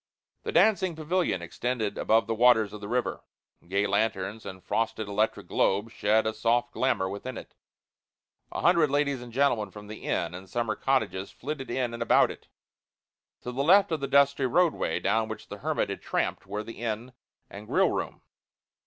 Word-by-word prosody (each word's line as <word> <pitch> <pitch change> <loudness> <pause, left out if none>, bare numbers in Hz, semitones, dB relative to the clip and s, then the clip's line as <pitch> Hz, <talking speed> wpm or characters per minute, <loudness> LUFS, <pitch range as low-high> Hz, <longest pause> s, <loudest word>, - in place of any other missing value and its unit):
The - - -4
dancing 190 -5 +3
pavilion 160 - -1
extended 110 +3 -2
above 110 -1 +2
the 115 - -1
waters 110 -3 +4
of 105 - -8
the 100 - -6
river. 125 +3 -2 0.4
Gay 100 +3 +1
lanterns 100 0 -1
and 95 -1 -9
frosted 115 -1 -1
electric 105 +2 0
globes 105 +4 0
shed 110 +2 +2
a 110 - 0
soft 115 +2 +1
glamour 125 -8 +1
within 100 +7 -6
it. - - -10 1.0
A - - -4
hundred 170 -4 +4
ladies 140 -2 0
and 120 -1 -10
gentlemen 120 -5 +1
from 105 +2 -11
the 105 +1 -9
inn 85 0 -1
and 95 +1 -9
summer 115 -2 -1
cottages 130 -8 0
flitted 140 -1 -6
in 120 -1 -1
and 115 - -6
about 115 - +4
it. - - -13 0.9
To 125 - -5
the 135 +3 -1
left 195 +4 +5
of 160 - 0
the 140 - -3
dusty 140 -1 +3
roadway 170 +6 +1
down 110 +3 +1
which 110 - -8
the - - -7
hermit - - -1
had - - -6
tramped - - -2
were 105 +1 -4
the 115 0 -10
inn 115 +2 -4 0.3
and 105 +2 -10
grill - - +3
room. - - -4
115 Hz, 180 wpm, -28 LUFS, 105-135 Hz, 1.0 s, left